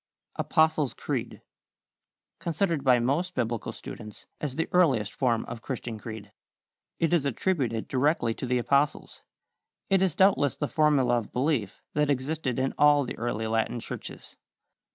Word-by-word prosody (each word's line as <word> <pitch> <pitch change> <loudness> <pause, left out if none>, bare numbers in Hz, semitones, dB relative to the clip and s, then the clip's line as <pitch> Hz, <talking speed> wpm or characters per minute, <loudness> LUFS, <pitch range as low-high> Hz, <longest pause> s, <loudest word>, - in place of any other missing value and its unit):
=Apostles' 160 -4 +2
Creed.= - - -4 1.0
Considered 170 -3 -1
by 125 -2 +5
most 160 +10 0
Biblical 115 -1 -2
students 105 -1 -10
as 140 -4 -4
the 165 - -1
earliest 130 - +3
form 120 -4 0
of 115 -1 -7
Christian 120 -4 -5
creed. 110 -2 -8 0.7
It 165 0 +1
is 170 -5 +3
attributed 135 -5 -1
directly 135 -3 +1
to 125 - -5
the 125 0 +1
Apostles. 140 +4 0 0.7
It 195 -1 +4
is 185 -5 +1
doubtless 190 -8 +3
the 145 - -2
formula 140 -6 +3
of 110 - -9
belief 125 -7 -1
that 150 0 +1
existed 140 -1 -1
in 130 +1 0
all 145 -1 +6
the 125 - -5
early 115 -2 -2
Latin 110 +2 0
churches. - - -8
135 Hz, 145 wpm, -27 LUFS, 115-155 Hz, 1.0 s, all